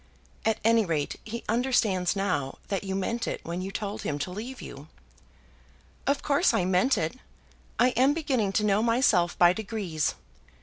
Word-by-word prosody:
"At 220 -1 +1
any 225 0 +4
rate, 160 -6 -2
he 230 +2 -6
understands 215 -6 +1
now 145 -9 -1
that 195 -2 -1
you 190 -1 -3
meant 230 +5 -2
it - - -2
when 170 +2 -3
you 190 - -4
told 200 +1 -4
him 145 - -2
to 145 +5 -4
leave 235 +7 -6
you." 140 +2 -9 1.2
"Of 280 +1 +1
course 290 +5 +3
I 180 - +1
meant 185 +9 +3
it. 160 +10 -2 0.6
I 245 - +5
am 260 +4 +3
beginning 260 -11 0
to 210 - +2
know 205 0 +3
myself 230 -7 +2
by 175 0 +6
degrees. 195 -7 -2
205 Hz, 170 wpm, -27 LUFS, 180-235 Hz, 1.2 s, by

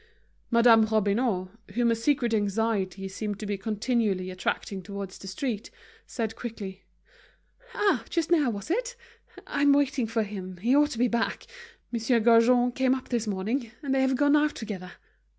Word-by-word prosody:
Madame 235 -1 +6
Robineau, 210 -2 0 0.2
whom 240 -1 +3
a - - +2
secret 240 0 +1
anxiety 200 -2 -1
seemed 205 +1 -5
to 215 - -5
be 205 0 -1
continually 210 -2 -1
attracting 185 +1 -3
towards 200 0 -7
the 195 - -10
street, 215 +2 -3 0.4
said 225 -3 -3
quickly: 200 -5 -7 0.9
"Ah, 410 -1 +2
just 335 -1 -1
now, 300 -7 +4
wasn't 235 - -1
it? - - -6 0.5
I'm 285 0 +3
waiting 280 -4 +1
for 225 0 0
him, 190 -3 -7
he 235 +9 +2
ought 295 0 +4
to 240 - -6
be 245 +2 +3
back; 235 -1 -1 0.5
Monsieur 235 0 +1
Gaujean 240 +2 +5
came 260 +1 +2
up 260 - -8
this 235 -3 -1
morning, 220 +5 -2
and 275 -2 -1
they 270 - +2
have 265 0 +2
gone 290 +2 +4
out 300 0 +2
together." 190 -5 -6
230 Hz, 165 wpm, -27 LUFS, 200-260 Hz, 0.9 s, Madame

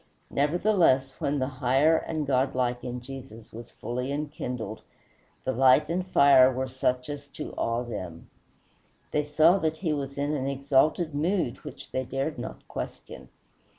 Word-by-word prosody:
Nevertheless, 150 -3 +2
when 145 +1 0
the 130 - 0 0.2
higher 135 +6 +4
and 155 -1 -2
godlike 125 -2 0
in 125 0 -5
Jesus 125 -4 -10
was 115 +1 -9
fully 125 +4 -4
enkindled, 125 -7 -4 0.6
the 130 - 0
light 130 +1 +4
and 180 +2 -1
fire 140 -6 +6
were 130 +1 -3
such 125 -1 -1
as 145 -1 -6
to 150 +2 -8
awe 115 +1 -1
them. 90 -8 -7 0.8
They 150 - +1
saw 160 +5 +4
that 160 -2 -1
he 160 -3 -1
was 140 -1 -4
in 145 +1 -1
an 135 -2 -2
exalted 140 +4 +1
mood, 155 -3 0
which 145 -3 -10
they 130 - -1
dared 135 +2 -3
not 125 - -8
question. - - -7
135 Hz, 150 wpm, -27 LUFS, 125-150 Hz, 0.8 s, fire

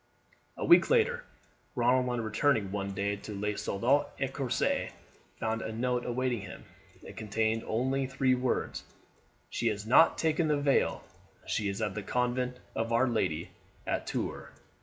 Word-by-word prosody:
A - - -2
week - - +6
later, 485 +1 +2 0.5
Ronald, 125 +1 +3
on 120 -1 -1
returning 110 -1 +1
one 100 -1 -3
day 100 +1 -1
to 100 0 -7
Le 105 0 -1
Soldat 125 +10 +1
Ecossais, 135 -2 0 0.5
found 110 0 -1
a - - -4
note 125 +2 -1
awaiting 125 -2 -1
him. 95 -1 -9 0.4
It - - -10
contained 110 +1 0
only 130 +4 0
the 130 -1 +2
words: 125 0 -1 0.7
"She 120 - -1
has 105 -2 -1
not 135 +8 +6
taken 160 0 +1
the 150 -1 +2
veil; 145 -1 +1 0.4
she 105 -2 -1
is 100 +3 -3
at 105 -3 -1
the 105 - -4
convent 125 +3 -1 0.2
of 115 +1 -1
Our 120 +3 +3
Lady 90 -9 -1 0.3
at - - -2
Tours." - - -3
120 Hz, 155 wpm, -30 LUFS, 105-130 Hz, 0.7 s, week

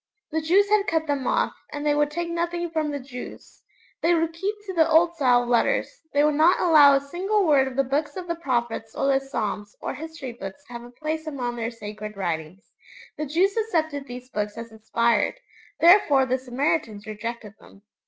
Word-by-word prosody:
The 320 +1 0
Jews 375 +6 +3
had 420 0 +2
cut 320 -1 +1
them 280 -4 -2
off, - - +1 0.2
and 290 0 -5
they 295 - +3
would 295 0 +2
take 345 +3 -3
nothing 345 0 -2
from 315 -2 -1
the 285 -1 -3
Jews; 250 -2 -10 0.4
they 340 +1 +3
would 330 0 0
keep 390 +6 -2
to 380 - -5
the 325 -2 +3
old 335 +2 +4
style 250 -6 +3
of - - -7
letters; 245 - +1
they 285 +1 +3
would 300 0 +3
not 315 +5 +4
allow 300 -5 +7
a - - +3
single 370 +8 -1
word 280 -4 +4
of 260 - -6
the 275 - +2
Books 285 +3 -2
of 365 - -5
the 340 - 0
Prophets 235 -8 -2
or - - -1
the 270 -1 +3
Psalms 210 -6 -4
or - - -4
History 320 -4 -7
Books 230 +4 -9
to 245 - -13
have 235 - -6
a 240 - -11
place 310 +5 -4
among 250 -5 -3
their 230 -1 -3
sacred 215 -2 -8
writings. 170 0 -4 0.4
The 305 - -4
Jews 365 +7 +2
accepted 315 -10 -1
these 250 +1 -8
Books 210 0 -3
as 230 0 -7
inspired; 220 0 +1 0.4
therefore 330 -7 +6
the 260 0 0
Samaritans 255 -3 -2
rejected 215 0 -6
them. 200 - -18
285 Hz, 205 wpm, -24 LUFS, 235-325 Hz, 0.4 s, allow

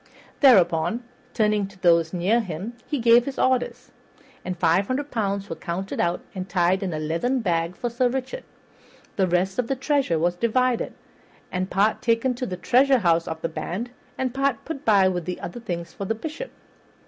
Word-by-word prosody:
Thereupon, 195 - +4 0.3
turning 210 -3 +2
to 195 -1 -17
those 170 -3 +4
near 190 +6 +2
him, 195 +2 -5
he 295 - -1
gave 235 0 +5
his 275 - -5
orders, 255 -1 0 0.5
and 185 -1 -4
five 175 +3 +2
hundred 280 +3 -2
pounds 200 -3 -1
were - - -5
counted 190 +2 -4
out 170 +1 0
and 185 -1 -6
tied 180 +1 +2
up - - -5
in 185 - -2
a - - -2
leathern 170 +12 -1
bag 170 -3 0
for 245 - -3
Sir 240 +1 +1
Richard. 265 - -4 0.7
The 190 -2 +2
rest 185 +4 0
of 245 - +1
the 270 - 0
treasure 275 - +1
was 175 +2 +1
divided, 240 +4 +1 0.6
and 185 +1 -2
part 205 +5 +2
taken 245 +1 +2
to 250 +1 -4
the 180 - -4
treasurehouse 235 -9 +3
of 160 0 -5
the - - +1
band, 200 +8 -4 0.3
and 255 -2 -1
part 270 -3 0
put 295 -3 -6
by 200 -3 +5
with 180 -3 -2
the 180 - -4
other 175 - -6
things 170 -6 -5
for 200 - -5
the 225 - -1
Bishop. 315 - -6
200 Hz, 190 wpm, -24 LUFS, 175-250 Hz, 0.7 s, gave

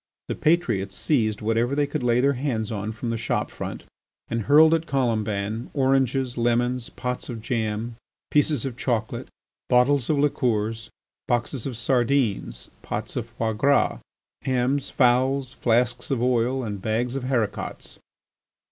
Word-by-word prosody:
The - - 0
patriots 120 - +1
seized 110 -8 0
whatever 115 +4 +1
they 145 0 +2
could 140 - -3
lay 120 0 +3
their 140 +2 +3
hands 120 -5 -2
on 105 0 -3
from 115 +1 -4
the 115 - -2
shop 115 - -1
front, - - -6 0.5
and 115 0 -1
hurled 155 +7 +6
at 165 0 0
Colomban 110 -4 -1
oranges, 135 -2 +1
lemons, 120 +1 +1
pots 125 0 -4
of 120 -2 -5
jam, 115 0 -2 0.3
pieces 150 -3 +2
of 130 -3 -4
chocolate, 120 -3 -2 0.4
bottles 125 +1 +3
of 155 - +2
liqueurs, 115 -6 0 0.4
boxes 120 +1 -1
of 125 -4 -5
sardines, 120 - 0
pots - - -4
of - - -3
foie 110 -1 -2
gras, 140 +6 +2 0.4
hams, 130 +2 0
fowls, 130 +1 +2
flasks 120 0 +1
of 135 -4 0
oil, 125 +1 +1
and 105 -4 -4
bags 115 +4 -1
of 135 -2 -3
haricots. 115 -6 -2
120 Hz, 145 wpm, -24 LUFS, 115-135 Hz, 0.5 s, hurled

